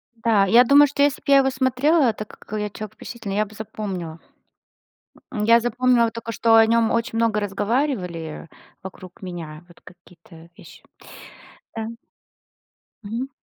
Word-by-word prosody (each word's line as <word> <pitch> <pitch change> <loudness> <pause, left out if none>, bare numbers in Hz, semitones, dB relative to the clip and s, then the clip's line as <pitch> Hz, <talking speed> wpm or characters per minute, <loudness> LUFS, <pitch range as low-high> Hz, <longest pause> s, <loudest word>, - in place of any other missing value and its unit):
Да, 225 -3 +2
я 230 +6 +6
думаю, 285 +3 +6
что 285 +1 -3
если 285 -2 +2
бы - - -45
я 275 - +8
его 270 -1 +3
смотрела, 260 +1 +2
так 215 0 -9
как 215 +1 -7
я 210 0 -3
человек 215 +1 -9
впечатлительный, 225 -5 -7
я 215 - +2
бы 215 +1 -16
запомнила. 195 -6 -6 1.1
Э. - - -4
Я 230 +2 +5
запомнила 240 0 +1
только, 230 0 -7
что 225 0 +3
о 225 0 +7
нем 230 0 +2
очень 230 0 -1
много 225 -2 +1
разговаривали 200 - -3 0.4
вокруг 185 -1 -11
меня, 170 -4 -8
вот 175 - -20
какие-то 170 -2 -17
вещи. - - -16 0.9
Да. 225 -1 -4 1.2
Мгм. 230 +6 -4
220 Hz, 150 wpm, -22 LUFS, 195-240 Hz, 1.2 s, я